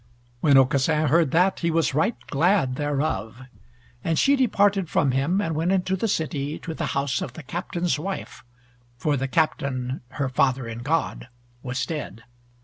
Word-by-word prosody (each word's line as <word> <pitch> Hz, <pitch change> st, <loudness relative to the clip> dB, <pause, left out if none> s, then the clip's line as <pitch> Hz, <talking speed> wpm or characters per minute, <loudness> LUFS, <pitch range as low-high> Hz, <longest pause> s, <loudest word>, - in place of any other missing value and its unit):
When 140 Hz, 0 st, +5 dB
Aucassin 140 Hz, +4 st, +3 dB
heard 165 Hz, -2 st, +4 dB
that, 180 Hz, +6 st, +2 dB
he 170 Hz, -, 0 dB
was 165 Hz, -3 st, +1 dB
right 160 Hz, -, +1 dB
glad 160 Hz, -3 st, +2 dB
thereof. 135 Hz, -6 st, -2 dB, 0.6 s
And 165 Hz, -1 st, 0 dB
she 280 Hz, -, +4 dB
departed 205 Hz, -, +2 dB
from 140 Hz, -, +2 dB
him, 140 Hz, +9 st, +1 dB
and 165 Hz, -5 st, -1 dB
went 165 Hz, +4 st, 0 dB
into 190 Hz, 0 st, +1 dB
the 210 Hz, +4 st, -1 dB
city 150 Hz, -5 st, -2 dB
to 165 Hz, -, -6 dB
the 160 Hz, -1 st, -3 dB
house 140 Hz, -2 st, 0 dB
of 130 Hz, -, -5 dB
the 160 Hz, -, -9 dB
Captain's 170 Hz, 0 st, -2 dB
wife, 190 Hz, -, -6 dB, 0.5 s
for 145 Hz, +4 st, 0 dB
the 135 Hz, 0 st, -1 dB
Captain 135 Hz, -3 st, -1 dB
her 140 Hz, -2 st, -1 dB
father 130 Hz, -1 st, +1 dB
in 115 Hz, 0 st, -6 dB
God 150 Hz, +1 st, -1 dB, 0.3 s
was 130 Hz, 0 st, -2 dB
dead. 125 Hz, -, -6 dB
150 Hz, 165 wpm, -24 LUFS, 130-170 Hz, 0.6 s, When